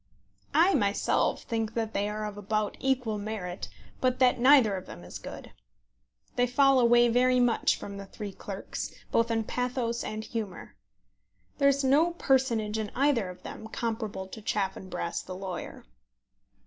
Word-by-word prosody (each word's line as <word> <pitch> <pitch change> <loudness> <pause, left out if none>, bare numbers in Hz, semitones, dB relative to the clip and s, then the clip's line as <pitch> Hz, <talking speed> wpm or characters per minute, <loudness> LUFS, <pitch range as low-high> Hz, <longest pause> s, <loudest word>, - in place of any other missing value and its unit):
I 355 +4 +6
myself 200 - +1
think 225 -1 -2
that 225 -1 -2
they 205 +1 0
are 215 0 -3
of 210 -1 -5
about 210 +1 -1
equal 250 -5 0
merit, 205 -4 -5 0.3
but 255 -1 +1
that 250 -2 +4
neither 255 -5 +6
of 185 - -7
them 85 - -10
is 85 - -8
good. - - -9 0.9
They 245 0 +3
fall 270 +1 +4
away 240 0 +6
very 250 +2 +3
much 245 -1 +3
from 200 0 -7
The 200 0 -8
Three 205 0 -7
Clerks, 195 +1 -6 0.2
both 230 0 +2
in 225 -1 +1
pathos 245 0 -2
and 215 0 -4
humour. 220 -5 -6 0.8
There 280 -1 +6
is 280 0 +1
no 300 +6 +4
personage 235 -8 +1
in 215 -2 -3
either 260 -8 +2
of 180 - -11
them 220 - -8
comparable 220 -4 -3
to 220 - -9
Chaffanbrass 190 -4 -2
the 185 - -8
lawyer. 185 -1 -6
225 Hz, 160 wpm, -29 LUFS, 205-250 Hz, 0.9 s, I